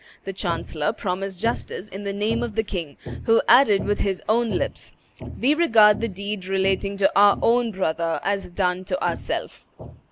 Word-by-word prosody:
The 195 - -5
chancellor 170 -2 -2
promised 190 -2 -4
justice 225 -2 -3
in 200 0 -8
the 200 - -2
name 205 +3 -1
of 235 -3 -4
the 220 - +1
king, 170 -8 -6 0.3
who 225 0 +4
added 230 -6 +5
with 205 0 -1
his 195 -2 -1
own 230 +2 +2
lips, - - -4 0.4
"We 270 +4 +3
regard 225 -11 +5
the 230 - 0
deed 200 -1 -6
relating 195 +1 0
to 195 - +3
our 205 0 +6
own 235 0 +2
brother 165 -4 -2
as 200 -1 -2
done 180 0 -1
to 275 - -2
ourself." - - -4
200 Hz, 170 wpm, -23 LUFS, 190-220 Hz, 0.4 s, our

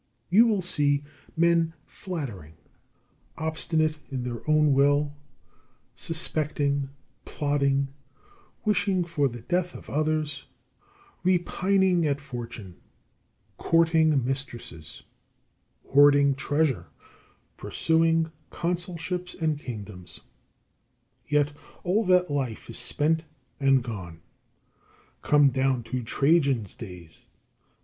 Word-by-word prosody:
You 225 +6 +7
will 205 -5 +1
see 145 -4 +1 0.3
men 165 -1 +3
flattering, 115 - -7 0.8
obstinate 160 0 0
in 130 -3 -3
their 120 -2 -4
own 150 -1 +4
will, 145 +1 +3 0.8
suspecting, 145 -4 0 0.3
plotting, 140 -2 0 0.8
wishing 200 -3 +2
for 150 -5 0
the 120 -1 -9
death 180 +6 -1
of - - -10
others, 155 0 -1 0.8
repining 185 -1 +2
at 140 -1 0
fortune, 115 -9 -8 0.8
courting 160 -5 +3
mistresses, 120 - -6 0.9
hoarding 140 0 +6
treasure, 145 0 0 0.7
pursuing 165 0 +1 0.2
consulships 175 +1 -3
and 155 -3 -1
kingdoms. 105 - -8 1.1
Yet 150 -1 +2 0.3
all 195 +6 +2
that 180 -3 +3
life 130 -5 -3
is - - -1
spent 160 +2 +1 0.4
and 135 -2 +3
gone. 95 -8 -7 1.0
Come 145 -1 +5
down 130 -1 0
to 130 - 0
Trajan's 135 - +2
days. 90 -7 -11
145 Hz, 90 wpm, -26 LUFS, 135-165 Hz, 1.1 s, You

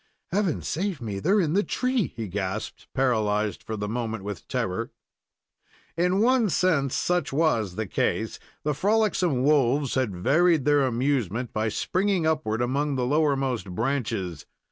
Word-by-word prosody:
"Heaven 190 -4 0
save 185 -1 -2
me! 105 -5 -4
they're 195 - +3
in 160 -5 +1
the 200 - +4
tree!" 250 0 -1
he 115 -2 -4
gasped, 95 0 -4
paralyzed 110 -5 +1
for 110 - -5
the 105 0 -3
moment 115 -2 -3
with 100 -3 -6
terror. - - -2 1.1
In 180 +4 +2
one 240 -2 +3
sense, 160 -7 +1
such 180 0 0
was 135 - +1
the 110 - -2
case. - - -1 0.2
The 150 - 0
frolicsome 185 - +1
wolves 140 -1 +3
had 125 -8 0
varied 155 - +3
their 145 -2 +4
amusement 125 -2 -1
by 110 +1 0
springing 185 - 0
upward 145 -8 0
among 140 +3 0
the 125 -1 0
lowermost 135 -6 +1
branches. 110 - -2
135 Hz, 145 wpm, -26 LUFS, 110-170 Hz, 1.1 s, the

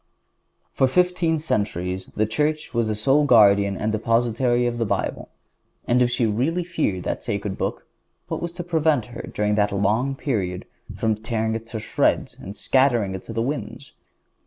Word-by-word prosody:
For 130 - +3
fifteen 180 +1 +2
centuries 95 - -2
the 110 - +2
Church 150 +8 -1
was 115 -2 +1
the 110 - -1
sole 135 +8 +3
guardian 100 -5 +5
and 110 - -1
depository 120 +2 +1
of 120 0 -1
the - - +2
Bible, - - -2 0.6
and 125 +1 +3
if 125 - +4
she 125 -1 +1
really 130 +12 0
feared 155 - -2
that - - -3
sacred 100 -1 -3
Book, - - -3 0.4
who - - -3
was 170 - -4
to 175 - -5
prevent 160 -7 +1
her, - - -6
during 105 0 0
that 105 -1 +2
long 110 +7 +1
period, 100 - -2 0.3
from 110 -1 +1
tearing 110 0 -2
it 115 +1 -6
in 110 - -3
shreds - - 0
and 100 +3 -8
scattering 120 -7 +2
it 95 - -5
to 115 - -7
the 115 +1 0
winds? 140 +1 -5
115 Hz, 175 wpm, -23 LUFS, 105-135 Hz, 0.6 s, guardian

